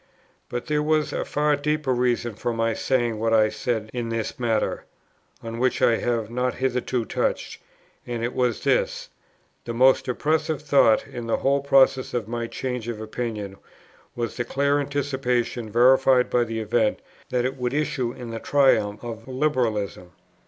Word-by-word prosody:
But 120 0 -4
there 150 0 0
was 155 0 +1
a - - -1
far 150 0 +1
deeper 150 -1 0
reason 120 -2 0
for 115 +3 -3
my 115 0 0
saying 120 -3 0
what 115 0 +2
I 110 -1 +4
said 110 -2 -3
in 120 -2 -3
this 115 +4 -3
matter, 115 -3 0 0.6
on 115 0 -6
which 130 0 +1
I 115 - +4
have 115 -2 -1
not 125 +1 -1
hitherto 125 -2 -1
touched; - - -2 0.5
and 120 -1 -3
it 120 - -2
was 125 -3 0
this: - - 0 0.6
The 115 - -4
most 130 +2 +4
oppressive 155 +4 0
thought, 140 -6 +4
in 120 -2 -7
the 115 - +1
whole 140 +1 +1
process 135 -2 +3
of 115 -4 -2
my 120 0 -3
change 125 -2 -4
of 115 -2 -4
opinion, 110 -3 -5 0.6
was 120 -1 -3
the 120 - 0
clear 140 +4 +1
anticipation, 130 -5 -1
verified 130 +2 +4
by 120 -1 +3
the 115 -1 -3
event, 110 0 +1 0.3
that 125 -1 0
it 130 +1 -1
would 125 -2 -2
issue 135 -5 -1
in 120 -2 -8
the 115 - -4
triumph 110 -8 +2
of 115 -1 -7
Liberalism. 120 -10 -1
120 Hz, 165 wpm, -24 LUFS, 115-135 Hz, 0.6 s, I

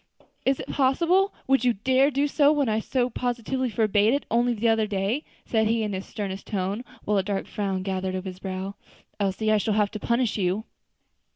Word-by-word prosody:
"Is 270 0 +2
it - - -5
possible! 335 +9 +2
Would 270 -2 +3
you 245 -1 +4
dare 260 +6 +3
to - - 0
do 285 +1 +3
so 290 0 +4
when 290 -3 +1
I 215 0 +1
so 245 +2 0
positively 250 +1 -2
forbade 215 +1 +3
it 285 - -3
only 240 +1 +2
the 230 +2 0
other 225 -1 +3
day?" 205 +8 -1 0.2
he - - -31
said 220 -2 +3
in 220 -2 0
his 190 0 -5
sternest 195 -2 -5
tone, 200 +2 -2 0.2
while 210 -1 +2
a - - 0
dark 200 0 -2
frown 195 -2 -2
gathered 190 -1 -2
on 185 - -3
his 185 -1 -7
brow. 190 +1 -4 0.5
"Elsie, 205 +2 0
I 215 - +4
shall 210 +1 0
have 210 -1 +2
to 215 - -5
punish 235 0 0
you." 190 +3 0
220 Hz, 210 wpm, -25 LUFS, 195-255 Hz, 0.5 s, you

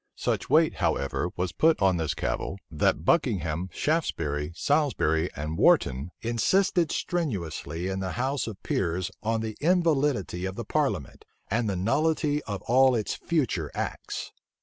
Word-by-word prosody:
Such - - -2
weight, - - +4
however 70 0 0
was 90 -1 -1
put 160 0 +3
on 95 -2 +3
this 80 -3 -1
cavil, 95 - -2
that 75 0 +1
Buckingham, 90 - +1
Shaftesbury, 75 - -1
Salisbury, 90 - +1
and 75 +3 -4
Wharton, 65 +6 +3
insisted 160 - +2
strenuously 90 - -2
in 95 0 -2
the 95 -1 -3
house 130 +2 -1
of 105 -4 -8
peers 90 0 -1
on 110 +1 0
the 110 -1 -4
invalidity 145 - +1
of 95 0 -4
the - - -5
parliament, - - -1 0.3
and 115 0 +1
the 100 - -1
nullity 150 - +1
of 100 -4 -5
all 130 +1 +4
its 110 -3 -1
future 120 - -1
acts. - - -4
105 Hz, 145 wpm, -27 LUFS, 85-145 Hz, 0.3 s, weight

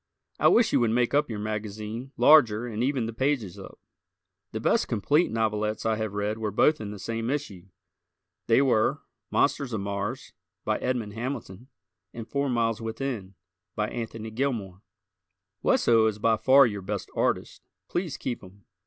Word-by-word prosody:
I - - +5
wish 230 -1 +4
you - - +5
would 120 -2 +2
make 120 +1 +1
up 145 0 +2
your 110 - -4
magazine 110 +3 -5
larger 120 -7 +6
and 115 -2 -4
even 130 -3 0
the 115 - -5
pages 130 -6 -1
up. - - -11 0.7
The - - -4
best - - +2
complete 145 - +2
novelettes 110 -1 -1
I 110 0 +2
have 110 -2 -3
read 105 +2 -2
were 110 -1 -1
both 150 +7 +3
in 105 - -5
the 105 - -7
same 115 +3 -3
issue. 110 -11 -4 0.8
They 115 +4 +5
were 115 -5 +2 0.3
"Monsters 135 -4 +1
of 105 - -1
Mars," 100 0 -4 0.3
by - - 0
Edmond 120 -5 -2
Hamilton 120 -2 -6 0.5
and 115 -2 -7
"Four 140 0 -1
Miles 115 -2 0
Within," 115 -4 -4 0.4
by 105 0 -1
Anthony 115 -2 -6
Gilmore. 110 -7 -2 0.8
Wesso 115 -2 +4
is 105 -2 -1
by 110 +1 +3
far 130 +5 +6
your 105 -4 -3
best 100 +1 -5
artist. - - -1 0.3
Please 175 -5 -3
keep 120 - -4
him. 95 +1 -16
115 Hz, 165 wpm, -27 LUFS, 105-130 Hz, 0.8 s, larger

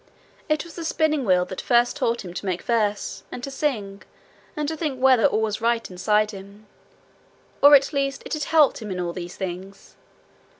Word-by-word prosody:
It 305 0 +1
was 340 - -12
the 335 - -7
spinning 315 -4 0
wheel 180 -2 +3
that 185 - -6
first 240 0 +2
taught 235 -6 -1
him 175 - -8
to 180 - -6
make 180 -1 -2
verses, 210 -4 -1
and 245 - -7
to 275 - -5
sing, 215 -9 -3 0.6
and 300 -1 -1
to 320 - -2
think 300 -5 -3
whether 255 -4 +5
all 220 - 0
was 215 0 -2
right 230 0 0
inside 210 +4 +1
him; 200 +1 -12 1.0
or 285 +1 +9
at 275 +2 +3
least 275 -1 -1
it - - -5
had 305 -2 -2
helped 305 -6 +3
him 215 - -6
in 185 -1 -4
all 175 -1 -3
these 175 -1 -7
things. 190 +1 -7
230 Hz, 200 wpm, -23 LUFS, 195-275 Hz, 1.0 s, or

